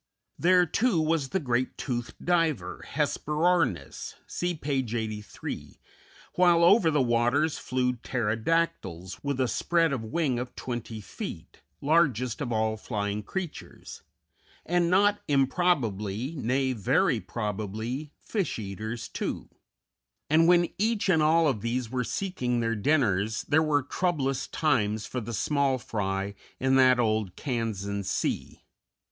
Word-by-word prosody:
] -, -, -40 dB
There, 180 Hz, 0 st, +6 dB
too, 200 Hz, +3 st, +1 dB
was 155 Hz, -3 st, +1 dB
the 190 Hz, -, 0 dB
great, 125 Hz, -4 st, -1 dB
toothed 120 Hz, -3 st, -4 dB
diver, 160 Hz, -, 0 dB
Hesperornis 150 Hz, -, 0 dB
(see 175 Hz, 0 st, -2 dB
page 135 Hz, -6 st, -2 dB
83), 110 Hz, -2 st, -5 dB, 0.5 s
while 175 Hz, -2 st, +4 dB
over 185 Hz, 0 st, +6 dB
the 150 Hz, -3 st, +2 dB
waters 120 Hz, +6 st, +2 dB
flew 125 Hz, 0 st, 0 dB
pterodactyls, 115 Hz, -, -1 dB
with 140 Hz, -2 st, -2 dB
a 130 Hz, -, +2 dB
spread 165 Hz, +3 st, +1 dB
of 125 Hz, -5 st, -2 dB
wing 130 Hz, +1 st, 0 dB
of 125 Hz, 0 st, -6 dB
twenty 120 Hz, -3 st, -5 dB
feet, 95 Hz, -, -8 dB, 0.2 s
largest 140 Hz, -6 st, +2 dB
of 125 Hz, -4 st, -2 dB
all 110 Hz, -1 st, 0 dB
flying 105 Hz, -2 st, -3 dB
creatures; 180 Hz, -, -7 dB, 0.6 s
and, 175 Hz, 0 st, +2 dB
not 205 Hz, +3 st, +3 dB
improbably 130 Hz, -, +1 dB
nay, 130 Hz, 0 st, 0 dB
very 105 Hz, -6 st, +2 dB
probably 110 Hz, +7 st, -4 dB
fish 200 Hz, -5 st, -2 dB
eaters, 110 Hz, +3 st, -5 dB
too; -, -, -4 dB, 0.8 s
and 165 Hz, +1 st, +5 dB
when 175 Hz, -1 st, +5 dB
each 215 Hz, -1 st, +1 dB
and 160 Hz, -4 st, +4 dB
all 160 Hz, +1 st, +4 dB
of 115 Hz, -8 st, 0 dB
these 120 Hz, 0 st, -2 dB
were 125 Hz, -1 st, 0 dB
seeking 125 Hz, -7 st, -2 dB
their 115 Hz, 0 st, 0 dB
dinners, 110 Hz, -4 st, +1 dB
there 155 Hz, +2 st, +3 dB
were 150 Hz, -3 st, +2 dB
troublous 140 Hz, -4 st, -1 dB
times 110 Hz, -9 st, 0 dB
for 125 Hz, -, -4 dB
the 115 Hz, +1 st, -6 dB
small 135 Hz, +6 st, +1 dB
fry 100 Hz, -4 st, -3 dB, 0.3 s
in 130 Hz, 0 st, +2 dB
that 130 Hz, -1 st, +5 dB
old 110 Hz, -5 st, 0 dB
Kansan 105 Hz, -6 st, -3 dB
sea. 95 Hz, -, -2 dB
130 Hz, 130 wpm, -28 LUFS, 110-160 Hz, 0.8 s, There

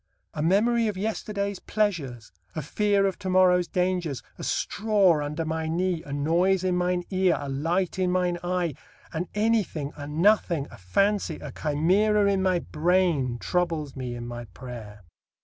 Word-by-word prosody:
A 150 Hz, -, -3 dB
memory 220 Hz, +7 st, +3 dB
of 205 Hz, -3 st, -3 dB
yesterday's 200 Hz, -1 st, -2 dB
pleasures, 155 Hz, -, -2 dB, 0.2 s
a 155 Hz, -, -3 dB
fear 200 Hz, +5 st, +2 dB
of 195 Hz, -, -1 dB
to 190 Hz, -2 st, -4 dB
morrow's 180 Hz, -1 st, +4 dB
dangers, 180 Hz, -6 st, -1 dB, 0.2 s
a -, -, -6 dB
straw 200 Hz, -8 st, +2 dB
under 150 Hz, +3 st, -3 dB
my 160 Hz, 0 st, -2 dB
knee, 175 Hz, +1 st, 0 dB
a 145 Hz, -, -10 dB
noise 170 Hz, +6 st, +2 dB
in 185 Hz, -1 st, +1 dB
mine 180 Hz, 0 st, 0 dB
ear, 185 Hz, -2 st, +2 dB
a 145 Hz, -, -5 dB
light 165 Hz, +7 st, -1 dB
in 185 Hz, -1 st, +2 dB
mine 180 Hz, -1 st, 0 dB
eye, 175 Hz, -3 st, -1 dB, 0.4 s
an 175 Hz, +3 st, -2 dB
anything, 210 Hz, -9 st, 0 dB
a 145 Hz, -1 st, -7 dB
nothing, 170 Hz, -1 st, +2 dB
a -, -, -11 dB
fancy, 195 Hz, -, +1 dB
a 145 Hz, -, -8 dB
chimera 190 Hz, +10 st, +2 dB
in 190 Hz, -, 0 dB
my 185 Hz, -1 st, +2 dB
brain 165 Hz, -7 st, +1 dB
troubles 165 Hz, -1 st, -1 dB
me 125 Hz, -2 st, -4 dB
in 120 Hz, 0 st, -6 dB
my 120 Hz, 0 st, -6 dB
prayer. 105 Hz, 0 st, -10 dB
175 Hz, 165 wpm, -26 LUFS, 150-190 Hz, 0.4 s, morrow's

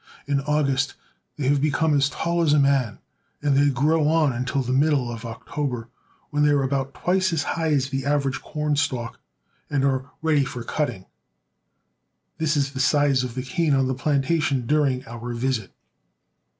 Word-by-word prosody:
In 140 Hz, -1 st, 0 dB
August 140 Hz, -2 st, 0 dB, 0.4 s
they 140 Hz, -3 st, -2 dB
have 140 Hz, 0 st, +3 dB
become 155 Hz, +1 st, +2 dB
as 140 Hz, 0 st, +3 dB
tall 170 Hz, +4 st, -1 dB
as 155 Hz, -3 st, +3 dB
a 150 Hz, -, +5 dB
man, 135 Hz, -6 st, +2 dB, 0.5 s
and 145 Hz, -2 st, +2 dB
they 145 Hz, +1 st, +4 dB
grow 150 Hz, +4 st, +2 dB
on 155 Hz, -3 st, +3 dB
until 130 Hz, +3 st, -1 dB
the 125 Hz, +1 st, -2 dB
middle 135 Hz, -3 st, +2 dB
of 115 Hz, 0 st, -7 dB
October, 120 Hz, 0 st, -4 dB, 0.4 s
when 145 Hz, 0 st, 0 dB
they 150 Hz, -, +5 dB
are 145 Hz, -1 st, +3 dB
about 135 Hz, 0 st, -2 dB
twice 185 Hz, +1 st, +1 dB
as 160 Hz, -4 st, 0 dB
high 165 Hz, +2 st, -1 dB
as 135 Hz, -1 st, +1 dB
the 135 Hz, -1 st, -2 dB
average 140 Hz, -1 st, 0 dB
corn 150 Hz, -1 st, -2 dB
stalk 130 Hz, -5 st, -2 dB, 0.5 s
and 140 Hz, -2 st, +1 dB
are 135 Hz, 0 st, 0 dB
ready 155 Hz, -3 st, +3 dB
for 125 Hz, -3 st, -5 dB
cutting. 120 Hz, -10 st, -3 dB, 1.3 s
This 155 Hz, -1 st, +1 dB
is 140 Hz, -1 st, 0 dB
the 135 Hz, -, -6 dB
size 140 Hz, -1 st, +3 dB
of 125 Hz, -2 st, -5 dB
the 130 Hz, -, -3 dB
cane 145 Hz, +3 st, +1 dB
on 135 Hz, -1 st, +2 dB
the 130 Hz, -, 0 dB
plantation 140 Hz, 0 st, 0 dB
during 140 Hz, -2 st, +1 dB
our 120 Hz, +1 st, -6 dB
visit. 120 Hz, -4 st, -2 dB
140 Hz, 175 wpm, -24 LUFS, 130-150 Hz, 1.3 s, a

